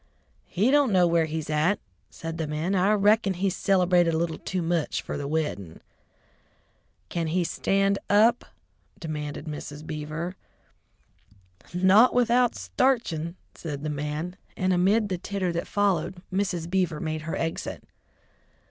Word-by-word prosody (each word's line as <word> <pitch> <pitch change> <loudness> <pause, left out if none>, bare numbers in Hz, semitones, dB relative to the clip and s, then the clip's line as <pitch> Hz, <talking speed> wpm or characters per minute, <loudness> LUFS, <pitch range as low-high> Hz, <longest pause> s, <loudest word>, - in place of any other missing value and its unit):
"He 210 +8 +1
don't 285 -4 +4
know 180 -2 +5
where 170 -1 +3
he's 160 -1 -4
at," 155 +6 +1 0.3
said 165 0 -7
the 160 - -1
man. 155 +5 -2
"I 190 +1 +3
rickon 205 -1 +3
he 190 +2 0
cilebrated 180 -3 +3
a - - +1
little 165 -1 -2
too 185 -2 -3
much 165 -2 -1
fer - - -5
the 145 - -4
weddin'." 145 - -3 1.3
"Can 170 -2 -2
he 175 +3 +1
stand 195 +3 +1
up?" 220 +4 +4 0.5
demanded 150 -2 -5
Mrs. 150 -1 -7
Beaver. 155 +4 -5 1.4
"Not 190 +8 +5
without 245 0 +3
starchin'," 185 -11 0 0.2
said 145 -3 -6
the 155 - -2
man, 150 +5 -4 0.2
and 185 0 +1
amid 200 +5 +3
the 185 -2 -2
titter 195 -1 -2
that 170 0 -3
followed, 195 -3 0
Mrs. 180 -4 -1
Beaver 175 -4 0
made 155 -1 -3
her 160 +1 -4
exit. 165 0 -3
175 Hz, 140 wpm, -26 LUFS, 155-195 Hz, 1.4 s, know